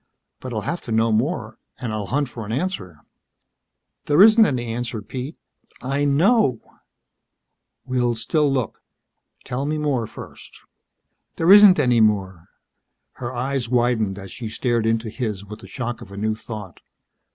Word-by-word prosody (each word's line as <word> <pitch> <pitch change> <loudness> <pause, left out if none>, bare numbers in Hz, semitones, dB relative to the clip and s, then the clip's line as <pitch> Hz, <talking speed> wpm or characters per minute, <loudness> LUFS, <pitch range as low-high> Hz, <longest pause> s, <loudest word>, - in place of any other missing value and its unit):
But 130 - -7
I'll 110 -2 -2
have 170 - -3
to 115 - -6
know 110 +1 +2
more. 110 -1 -1 0.2
And 120 -4 -4
I'll 105 -2 -3
hunt 145 +1 0
for 120 -2 -8
an 105 - -6
answer." 110 - -3 1.1
"There 145 +2 +3
isn't 220 0 +7
any 125 -4 -2
answer, 120 -1 -4
Pete. 130 +7 -6 0.4
I 140 +3 -1
know." 145 - +3 1.3
"We'll 125 -2 0
still 145 +6 +1
look. 130 -4 -2 0.6
Tell 135 +3 -3
me 155 +1 -1
more, 140 -7 -1
first." - - -12 0.8
"There 165 +3 +3
isn't 205 -2 +9
any 120 -3 +3
more." 95 -5 0 0.7
Her 120 0 -3
eyes 130 -1 -2
widened 120 -5 +1
as 95 -1 -9
she 115 -4 -6
stared 115 0 0
into 115 0 0
his 105 -4 -4
with 105 +1 -10
the - - -12
shock 120 -2 -5
of 100 - -11
a 100 - -9
new 110 +2 0
thought. 110 -4 -9
120 Hz, 155 wpm, -22 LUFS, 110-140 Hz, 1.3 s, isn't